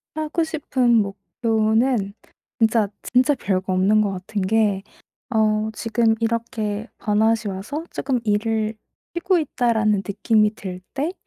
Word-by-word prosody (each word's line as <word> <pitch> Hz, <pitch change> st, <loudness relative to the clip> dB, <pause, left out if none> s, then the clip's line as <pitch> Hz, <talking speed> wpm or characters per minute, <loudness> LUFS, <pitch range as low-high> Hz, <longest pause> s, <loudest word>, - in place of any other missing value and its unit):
하고 310 Hz, +2 st, -1 dB
싶은 275 Hz, -6 st, +1 dB
목표는 220 Hz, +2 st, +1 dB, 0.5 s
진짜 225 Hz, -2 st, +3 dB
진짜 255 Hz, +4 st, +3 dB
별거 185 Hz, -1 st, 0 dB
없는 195 Hz, +4 st, +4 dB
것 205 Hz, -2 st, 0 dB
같은 195 Hz, +2 st, -4 dB
게 200 Hz, 0 st, +1 dB, 0.5 s
어 215 Hz, 0 st, +2 dB
지금 230 Hz, 0 st, +1 dB
이렇게 225 Hz, -2 st, -2 dB
'번아웃이 220 Hz, 0 st, +1 dB
와서 215 Hz, -, -5 dB
쪼끔 265 Hz, -2 st, -1 dB
일을 215 Hz, +1 st, 0 dB, 0.4 s
쉬고 355 Hz, +1 st, +2 dB
있다.'라는 220 Hz, -8 st, +1 dB
느낌이 210 Hz, +1 st, +2 dB
들 185 Hz, -3 st, -7 dB
때 300 Hz, +6 st, -2 dB
220 Hz, 245 characters per minute, -22 LUFS, 205-235 Hz, 0.5 s, 없는